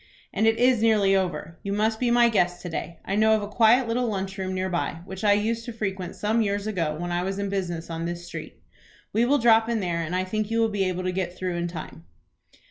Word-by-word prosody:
"And 220 Hz, -, +2 dB
it 225 Hz, 0 st, +3 dB
is 245 Hz, -2 st, +3 dB
nearly 210 Hz, -4 st, +4 dB
over. 165 Hz, -3 st, -2 dB
You 200 Hz, -, -3 dB
must 220 Hz, +2 st, +1 dB
be 245 Hz, -, +1 dB
my 240 Hz, 0 st, +5 dB
guest 180 Hz, -5 st, +1 dB
to 175 Hz, -, -5 dB
day. 170 Hz, 0 st, -5 dB
I 195 Hz, -, -1 dB
know 220 Hz, +1 st, +4 dB
of 215 Hz, -, -1 dB
a -, -, -4 dB
quiet 230 Hz, +4 st, +4 dB
little 240 Hz, +2 st, 0 dB
lunch 195 Hz, -2 st, -3 dB
room 190 Hz, 0 st, -2 dB
near 185 Hz, 0 st, -1 dB
by, 170 Hz, -2 st, -2 dB
which 190 Hz, 0 st, -8 dB
I 205 Hz, -1 st, +5 dB
used 225 Hz, +3 st, 0 dB
to 240 Hz, -, -5 dB
frequent 195 Hz, -5 st, -4 dB
some 220 Hz, +2 st, +1 dB
years 200 Hz, -1 st, -1 dB
ago 170 Hz, -8 st, -1 dB
when 175 Hz, 0 st, -3 dB
I 175 Hz, 0 st, 0 dB
was 190 Hz, +2 st, -3 dB
in 200 Hz, 0 st, -2 dB
business 175 Hz, -4 st, -3 dB
on 165 Hz, 0 st, -4 dB
this 175 Hz, 0 st, -5 dB
street. 175 Hz, -, -9 dB, 0.5 s
We 230 Hz, +3 st, +3 dB
will 285 Hz, +4 st, +3 dB
drop 225 Hz, -2 st, +4 dB
in 230 Hz, -1 st, 0 dB
there 175 Hz, -4 st, -1 dB
and 165 Hz, +2 st, -3 dB
I 185 Hz, -, +1 dB
think 215 Hz, +3 st, -2 dB
you 225 Hz, 0 st, 0 dB
will 225 Hz, -1 st, +3 dB
be 205 Hz, -2 st, 0 dB
able 185 Hz, 0 st, -2 dB
to 185 Hz, -, 0 dB
get 180 Hz, -1 st, -3 dB
through 185 Hz, -1 st, -2 dB
in 170 Hz, 0 st, -1 dB
time." 155 Hz, -, -8 dB
195 Hz, 260 wpm, -25 LUFS, 180-220 Hz, 0.5 s, my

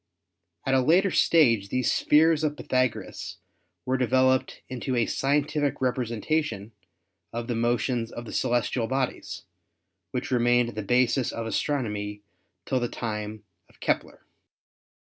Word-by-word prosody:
At 135 Hz, -, +1 dB
a 130 Hz, -, +4 dB
later 180 Hz, +8 st, +4 dB
stage 115 Hz, -16 st, +4 dB
these 130 Hz, +3 st, +1 dB
spheres 160 Hz, +1 st, +4 dB
of 150 Hz, -1 st, 0 dB
Pythagoras 130 Hz, -2 st, -2 dB, 0.5 s
were 130 Hz, 0 st, 0 dB
devel 130 Hz, +1 st, +4 dB
oped 130 Hz, -, -6 dB
into 130 Hz, +1 st, -3 dB
a 120 Hz, -1 st, +2 dB
scientific 145 Hz, +1 st, 0 dB
representation 120 Hz, -2 st, -1 dB, 0.6 s
of 115 Hz, 0 st, -4 dB
the 120 Hz, -, -1 dB
motions 120 Hz, 0 st, 0 dB
of 120 Hz, -, -7 dB
the -, -, -8 dB
celestial 120 Hz, -1 st, 0 dB
bodies, 130 Hz, 0 st, -3 dB, 0.7 s
which -, -, -4 dB
remained 120 Hz, -1 st, +3 dB
the 110 Hz, -2 st, -5 dB
basis 125 Hz, +3 st, +2 dB
of 115 Hz, -, -4 dB
astronomy 105 Hz, -6 st, -2 dB, 0.4 s
till 130 Hz, -, 0 dB
the 120 Hz, -1 st, -2 dB
time 105 Hz, -2 st, -5 dB, 0.3 s
of -, -, -25 dB
Kepler." -, -, -2 dB
125 Hz, 130 wpm, -26 LUFS, 115-135 Hz, 0.7 s, a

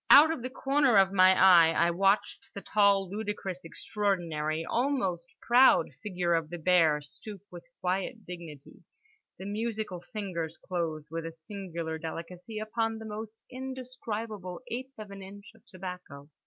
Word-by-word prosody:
Out 300 Hz, +3 st, +9 dB
of 325 Hz, -, -3 dB
the 255 Hz, -, -4 dB
corner 270 Hz, -3 st, +2 dB
of 195 Hz, 0 st, +5 dB
my 185 Hz, 0 st, +6 dB
eye 175 Hz, -3 st, +7 dB
I 170 Hz, +1 st, +3 dB
watched 195 Hz, +4 st, +1 dB
the 200 Hz, -, -5 dB
tall, 200 Hz, -2 st, +3 dB
ludicrous, 200 Hz, -2 st, -4 dB
extraordinary, 165 Hz, -4 st, -2 dB
almost 230 Hz, -, 0 dB, 0.2 s
proud 250 Hz, +2 st, +5 dB
figure 180 Hz, -5 st, -1 dB
of 165 Hz, -2 st, 0 dB
the 175 Hz, -, -5 dB
bear 165 Hz, -3 st, +3 dB
stoop 195 Hz, +7 st, -10 dB
with 175 Hz, -1 st, -10 dB, 0.2 s
quiet 195 Hz, +5 st, -2 dB
dignity, 170 Hz, -5 st, -10 dB, 0.6 s
the 190 Hz, -, -8 dB
musical 215 Hz, -2 st, -3 dB
fingers 175 Hz, -5 st, -5 dB
close 160 Hz, -4 st, -4 dB
with 165 Hz, 0 st, -3 dB
a -, -, -6 dB
singular 165 Hz, -1 st, -6 dB
delicacy 175 Hz, +6 st, -7 dB
upon 225 Hz, +1 st, -1 dB
the 220 Hz, -, -8 dB
moist 220 Hz, +1 st, -8 dB
indescribable 235 Hz, -7 st, -6 dB
eighth 260 Hz, +3 st, -5 dB
of 210 Hz, -2 st, -9 dB
an 195 Hz, 0 st, -9 dB
inch 200 Hz, +1 st, -11 dB
of -, -, -23 dB
tobacco. 180 Hz, -6 st, -9 dB
190 Hz, 150 wpm, -29 LUFS, 170-220 Hz, 0.6 s, Out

